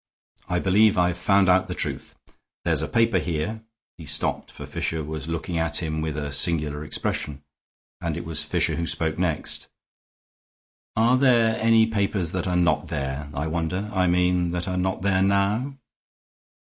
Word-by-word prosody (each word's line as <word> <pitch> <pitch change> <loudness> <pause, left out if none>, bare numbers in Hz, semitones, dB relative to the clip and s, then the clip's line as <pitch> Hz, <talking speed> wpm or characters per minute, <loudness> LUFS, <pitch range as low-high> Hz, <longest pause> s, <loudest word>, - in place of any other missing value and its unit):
I 90 - +1
believe 100 +3 +4
I've 90 -1 +1
found 100 +1 +3
out 95 0 +4
the - - -3
truth. - - -3 0.5
There's 80 -3 +1
a 80 - -2
paper 115 0 +2
here 90 +7 -3 0.2
" - - -77
He 80 - -9
stopped, 75 +2 -1
for - - -9
Fisher 80 -1 -2
was 75 0 -6
looking 85 +1 -3
at 80 0 0
him 80 -1 -2
with 80 -1 -3
a 75 -1 -3
singular 75 -1 +1
expression; 75 -1 -3 0.6
and - - -2
it - - -6
was - - -1
Fisher - - 0
who 85 0 -2
spoke 80 0 -1
next: 85 -4 -2 1.3
"Are 115 +3 +4
there 120 -4 +4
any 115 0 +5
papers 100 -5 -1
that 90 0 -2
are 90 - 0
not 85 -4 +2
there, 70 +1 -4
I 70 - -2
wonder? 85 +6 -2
I 95 -2 +2
mean 90 0 +2
that 90 +1 -2
are 90 - -2
not 95 +1 -1
there 95 -1 +2
now?" 100 +8 +1
90 Hz, 175 wpm, -24 LUFS, 80-100 Hz, 1.3 s, any